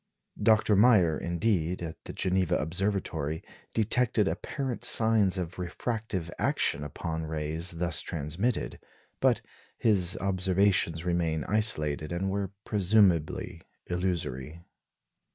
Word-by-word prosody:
Dr. 110 -1 +4
Meyer, 100 -7 +5
indeed, 85 -1 -1
at 80 -1 -8
the - - -7
Geneva 90 -1 0
Observatory, 80 -3 -2 0.3
detected 110 -1 +2
apparent 130 +1 -4
signs 110 -4 +5
of 90 0 -5
refractive 95 -1 -4
action 70 - +1
upon 80 +2 -4
rays 80 +2 -2
thus 85 -3 0
transmitted; 85 - -3 0.4
but - - +2 0.4
his 95 -6 +1
observations 95 -3 +1
remain 85 -3 0
isolated, 75 -8 +2
and 95 +3 -2
were 100 -1 -2 0.2
presumably 95 -6 +2 0.2
illusory. 85 -4 -3
90 Hz, 100 wpm, -28 LUFS, 80-105 Hz, 0.4 s, Meyer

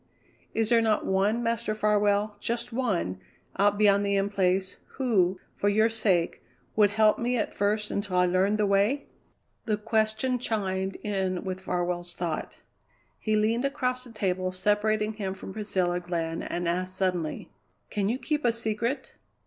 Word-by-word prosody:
"Is 225 -1 +1
there 235 -1 +5
not 220 -2 +1
one, 205 +5 +1
Master 230 -1 -1
Farwell, 210 0 +2
just 235 +2 -3
one, 195 - -1 0.4
out 205 +1 +3
beyond 200 -1 +4
the 200 0 +1
In 195 0 +1
Place, 190 -1 0 0.2
who, 190 -8 +2 0.2
for 205 - +1
your 220 +2 +4
sake, 200 -7 +1 0.3
would 210 -1 +5
help 215 +1 +3
me 245 +1 0
at 215 - -1
first 210 +1 0
until 200 -2 -2
I 180 - +5
learned 185 +4 +2
the 210 - +2
way?" 205 +8 +2 0.6
The 215 -2 +1
question 220 +4 0
chimed 195 -5 -1
in 190 -3 -1
with 185 -1 -4
Farwell's 175 -1 -2
thought. 170 -3 -4 0.6
He 215 -1 0
leaned 220 +3 +2
across 255 -2 -1
the 245 - -12
table 185 -4 -1
separating 210 +3 +1
him 195 -3 -4
from 190 - -8
Priscilla 185 -4 0
Glenn 165 -2 -3
and 175 0 -3
asked 185 +2 -1
suddenly: 180 -4 -2 0.4
"Can 205 -2 0
you 240 - 0
keep 300 +2 -2
a 240 - +4
secret?" 230 +3 -2
205 Hz, 160 wpm, -27 LUFS, 185-220 Hz, 0.6 s, there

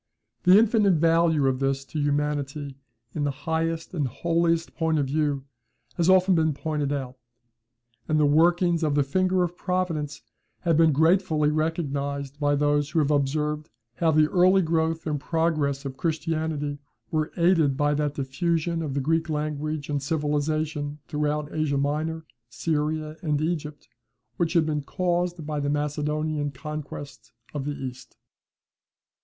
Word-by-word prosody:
The 180 +2 +8
infinite 215 -4 +4
value 165 -2 +3
of 130 -1 +1
this 135 0 -1
to 155 - -5
humanity 145 -1 -1 0.4
in 150 - -2
the 145 - +1 0.2
highest 165 +1 -1
and 150 -6 0
holiest 165 +4 0
point 160 -1 0
of 145 - +1
view 145 -1 0 0.5
has 170 0 +1
often 185 0 +5
been 160 -2 +2
pointed 150 -2 -2
out; 130 -3 -4 0.9
and 155 0 +2
the 150 - +4
workings 170 +3 +3
of 150 -3 +1
the 145 - +4
finger 185 +5 +1
of 175 0 -3
Providence 175 -6 -2 0.4
have 170 -3 +2
been 160 0 +5
gratefully 160 0 +3
recognised 145 -3 -2
by 145 -1 +2
those 145 0 +1
who 155 - -3
have 150 -2 +3
observed 150 +2 0 0.3
how 165 - +2
the 155 -1 +5
early 185 +1 +5
growth 160 0 0
and 150 -2 -1
progress 155 -3 0
of 135 -1 -5
Christianity 155 -3 -2 0.3
were 155 -1 0
aided 165 -6 +3
by 145 0 +2
that 145 -1 -1
diffusion 165 +4 -1
of 145 -4 -3
the 140 - 0
Greek 165 +4 0
language 150 -1 -2
and 145 -1 -1
civilization 150 0 -1
throughout 150 0 -2
Asia 155 -3 0
Minor, 155 +3 -1 0.2
Syria, 155 +4 -2
and 150 -4 0
Egypt 155 -2 -3 0.5
which 170 -1 0
had 165 -3 +4
been 150 -1 -1
caused 175 +1 -1
by 150 -1 -2
the 145 0 -1
Macedonian 150 0 -1
conquest 145 0 -8 0.2
of 145 -2 -3
the 145 - -2
East. 130 -2 -8
155 Hz, 150 wpm, -25 LUFS, 145-165 Hz, 0.9 s, The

